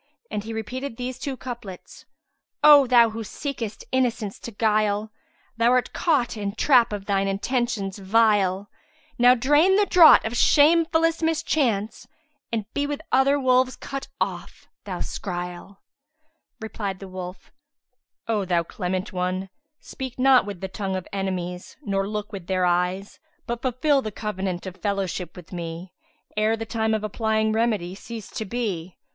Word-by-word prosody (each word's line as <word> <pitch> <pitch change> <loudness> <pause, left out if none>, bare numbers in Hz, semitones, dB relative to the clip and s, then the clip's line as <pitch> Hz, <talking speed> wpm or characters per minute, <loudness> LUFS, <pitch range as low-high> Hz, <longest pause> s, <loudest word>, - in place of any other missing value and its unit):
And 205 - -3
he 225 - -7
repeated 230 +3 -5
these 250 0 -5
two 270 -2 -4
couplets, 235 -8 -9 0.6
"O 290 -3 +8
thou 235 -2 +5
who 225 +1 -5
seekest 230 -1 -5
innocence 240 -5 -1
to 235 - -7
'guile, 215 0 +1 0.2
* 250 - -38
Thou'rt 245 +2 +3
caught 285 -9 +1
in 205 -1 -4
trap 245 -1 +4
of 205 -2 -5
thine 195 -1 +1
intentions 200 -1 -2
vile: 200 -2 +2 0.5
Now 245 +1 +7
drain 295 +9 +4
the 410 +1 +4
draught 340 -5 +7
of 225 - -2
shamefullest 330 +4 +4
mischance, 280 -10 0 0.2
* 290 -1 -49
And 220 -3 -2
be 285 0 0
with 290 0 -4
other 270 +2 +4
wolves 255 -1 +3
cut 275 0 -6
off, - - -4 0.2
thou - - -5
scroyle!" 180 +1 -6 0.8
Replied 205 -3 -4
the 195 - -9
wolf, 185 0 -8 0.8
"O 215 -3 0
thou 175 -2 +1
clement 185 +3 -4
one, 185 +1 -2 0.3
speak 260 -2 -7
not 260 -3 +5
with 200 -4 -7
the 190 - -3
tongue 190 0 -4
of 185 -2 -5
enemies 180 -2 -4
nor 195 -1 -1
look 210 -1 -4
with 190 -4 -8
their 185 -1 +1
eyes; 180 +3 -1 0.3
but 235 0 -4
fulfil 270 +3 +2
the 215 - -5
covenant 190 -4 -4
of 185 -1 -7
fellowship 195 -3 -3
with 180 0 -12
me, 170 +1 -6 0.4
ere 215 +1 +2
the 225 - -5
time 220 0 0
of 215 - -3
applying 220 0 0
remedy 215 -6 0
cease 220 +2 -8
to 220 - -4
be. 190 -6 -4
215 Hz, 155 wpm, -24 LUFS, 195-250 Hz, 0.8 s, O